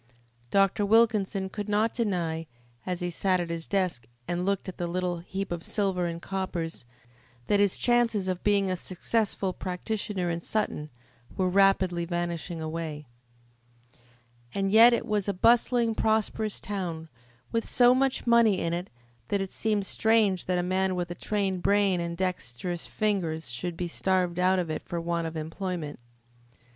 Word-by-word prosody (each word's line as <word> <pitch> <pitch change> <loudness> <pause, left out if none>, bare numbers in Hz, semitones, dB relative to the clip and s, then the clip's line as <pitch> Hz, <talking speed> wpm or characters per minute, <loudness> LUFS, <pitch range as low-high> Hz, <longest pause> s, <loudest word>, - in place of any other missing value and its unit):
Dr. 195 +3 +3
Wilkinson 205 -3 +3
could 205 +2 -6
not 215 +2 +2
deny, 170 -8 -1 0.4
as 180 -1 -2
he 175 0 -2
sat 185 +2 +1
at 170 -1 -3
his 165 -1 -4
desk 180 - -1 0.2
and 175 0 -1
looked 200 +1 -1
at 185 - -7
the 175 - -1
little 180 0 -2
heap 190 +3 -5
of 170 -1 -3
silver 190 -4 0
and 170 0 -4
coppers, 175 -6 -4 0.6
that 205 - +2
his 200 -2 +3
chances 230 -5 +2
of 185 -1 -2
being 200 -2 +2
a - - +1
successful 195 +2 -1
practitioner 185 0 -3
in 170 0 -3
Sutton 170 -7 -2 0.5
were 185 -1 +2
rapidly 185 -2 +3
vanishing 175 0 -3
away. 155 -1 -4 1.5
And 195 -1 0
yet 230 +3 +8
it 235 - 0
was 210 -2 -1
a 200 - 0
bustling, 235 +2 +3
prosperous 220 -1 0
town, 175 -5 -4 0.4
with 230 0 0
so 245 0 +6
much 265 0 +1
money 235 -5 +5
in 165 0 -1
it 175 +2 -3 0.4
that 200 - 0
it 195 -1 -3
seemed 210 -3 0
strange 220 -3 +2
that 180 -1 +1
a 175 - 0
man 185 +1 0
with 175 -1 -3
a - - -1
trained 195 -1 -1
brain 200 -2 +3
and 170 0 -4
dexterous 175 -2 -3
fingers 170 - -1
should 170 +7 -4
be 180 - -2
starved 180 0 0
out 185 +1 +3
of 175 -3 -1
it - - -3
for 170 - -4
want 170 0 -1
of 160 0 -6
employment. 165 -1 -4
185 Hz, 165 wpm, -27 LUFS, 175-205 Hz, 1.5 s, yet